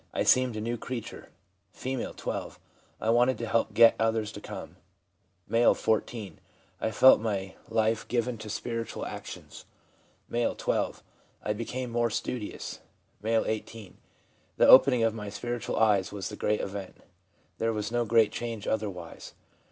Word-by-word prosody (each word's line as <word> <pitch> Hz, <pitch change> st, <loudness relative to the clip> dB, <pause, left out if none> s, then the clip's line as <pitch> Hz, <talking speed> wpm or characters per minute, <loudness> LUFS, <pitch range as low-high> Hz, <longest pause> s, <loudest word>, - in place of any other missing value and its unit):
I -, -, +1 dB
seemed 130 Hz, -2 st, +4 dB
a 110 Hz, -, -3 dB
new 115 Hz, +1 st, -3 dB
creature/ 125 Hz, -1 st, -6 dB, 0.5 s
F., 130 Hz, -1 st, -4 dB
12. -, -, -5 dB, 0.2 s
' -, -, -35 dB
I 110 Hz, -, +2 dB
wanted 120 Hz, +1 st, +3 dB
to 115 Hz, -, -4 dB
help 115 Hz, 0 st, 0 dB
get 115 Hz, 0 st, +8 dB
others 110 Hz, -1 st, +1 dB
to 105 Hz, -, -9 dB
come/ -, -, -8 dB, 0.8 s
M., 115 Hz, +1 st, +5 dB
14. 110 Hz, -1 st, -2 dB, 0.2 s
' -, -, -35 dB
I -, -, +1 dB
felt 130 Hz, +2 st, +7 dB
my 100 Hz, -4 st, -2 dB, 0.2 s
life 110 Hz, 0 st, +1 dB
given 120 Hz, -1 st, -1 dB
to 110 Hz, 0 st, -8 dB
spiritual 115 Hz, +2 st, -4 dB
actions/ -, -, -8 dB, 0.7 s
M., 120 Hz, 0 st, +1 dB
12. -, -, -1 dB, 0.4 s
'I 105 Hz, -, 0 dB
became 120 Hz, +3 st, -4 dB
more 120 Hz, 0 st, +1 dB
studious/ 110 Hz, 0 st, -4 dB, 0.4 s
M., 110 Hz, 0 st, +2 dB
18. 110 Hz, -2 st, -5 dB
1 -, -, -26 dB, 0.6 s
The -, -, +5 dB
opening 130 Hz, -2 st, +8 dB
of 115 Hz, -1 st, +2 dB
my 105 Hz, -2 st, -6 dB
spiritual 120 Hz, +3 st, -4 dB
eyes 105 Hz, -4 st, +3 dB
was 100 Hz, -2 st, -4 dB
the 105 Hz, -, -7 dB
great 105 Hz, +1 st, 0 dB
event; 100 Hz, -1 st, -6 dB, 0.6 s
there 115 Hz, 0 st, +1 dB
was 105 Hz, 0 st, -3 dB
no 120 Hz, 0 st, +1 dB
great 115 Hz, -1 st, +4 dB
change 115 Hz, -3 st, -5 dB
otherwise. 100 Hz, -6 st, -4 dB
115 Hz, 160 wpm, -28 LUFS, 105-120 Hz, 0.8 s, get